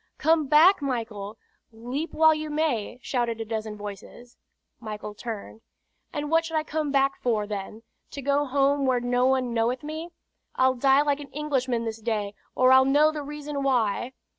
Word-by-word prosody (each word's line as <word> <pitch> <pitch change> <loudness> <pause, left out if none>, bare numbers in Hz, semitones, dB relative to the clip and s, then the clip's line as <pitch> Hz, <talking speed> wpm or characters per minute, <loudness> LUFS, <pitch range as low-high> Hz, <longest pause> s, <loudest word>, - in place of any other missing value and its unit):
"Come 315 -2 +2
back, 310 +6 +6
Michael! 225 -6 -4 0.3
Leap 245 +8 -5
while 315 0 +5
you 310 0 -4
may!" 290 -7 -1
shouted 240 -4 -1
a 225 - -3
dozen 215 -1 -4
voices. 210 +4 -10 0.4
Michael 210 -2 -7
turned: 220 -1 -7 0.5
"And 295 -1 -4
what 330 0 +4
should 325 -1 -5
I 310 - 0
come 310 -1 -2
back 275 0 +1
for, 220 -4 0
then, 210 +2 -6 0.3
to 280 - -7
go 285 +2 +1
home 275 0 +1
where 255 -1 +2
no 245 +1 +1
one 260 -2 +1
knoweth 235 +4 0
me? 315 +3 -6 0.5
I'll 260 0 +3
die 270 +3 +4
like 290 -1 0
an 285 -2 -9
Englishman 260 -5 -1
this 225 0 -5
day, 210 -3 -2 0.2
or 255 0 +5
I'll 260 0 +7
know 290 +3 +4
the 305 -1 -5
reason 295 0 -5
why!" 245 -2 0
260 Hz, 175 wpm, -26 LUFS, 230-295 Hz, 0.5 s, I'll